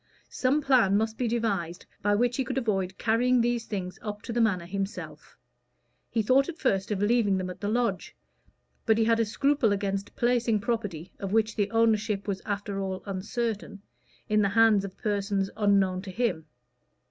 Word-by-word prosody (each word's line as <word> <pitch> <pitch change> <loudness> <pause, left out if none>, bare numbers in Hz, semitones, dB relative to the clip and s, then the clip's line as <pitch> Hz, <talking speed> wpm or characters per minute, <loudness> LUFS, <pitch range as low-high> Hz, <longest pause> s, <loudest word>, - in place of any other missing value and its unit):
Some 275 +4 +1
plan 235 -8 +4
must 220 +1 -1
be 245 +1 -1
devised 200 -7 -2 0.2
by 205 0 +2
which 245 +3 +1
he 265 - +1
could 255 - -4
avoid 195 -7 -1
carrying 245 +3 +2
these 240 -1 0
things 185 -3 -5
up 210 0 -6
to 230 - -5
the 235 - +1
Manor 190 -6 +1
himself: 195 +3 -6 0.7
he 225 - 0
thought 265 +6 +3
at 335 - -6
first 195 -10 0
of 205 -1 -1
leaving 205 -3 +3
them 185 -1 -3
at 180 - -12
the 205 - -2
lodge, 225 -5 -1 0.7
but 220 -1 +4
he 225 - +3
had 230 0 +3
a 230 - +3
scruple 275 +1 +1
against 200 0 -2
placing 235 -2 +2
property, 200 -7 -3
of 195 0 -4
which 220 -1 +2
the 205 -2 0
ownership 215 -2 +1
was 195 -2 -2
after 205 -1 -3
all 190 -1 -4
uncertain, 210 +2 -3 0.5
in 215 0 +3
the 200 - +2
hands 220 -1 +4
of 195 -1 -7
persons 200 -2 -1
unknown 195 -3 +2
to 195 - -9
him. 185 -7 -1
210 Hz, 180 wpm, -27 LUFS, 195-230 Hz, 0.7 s, plan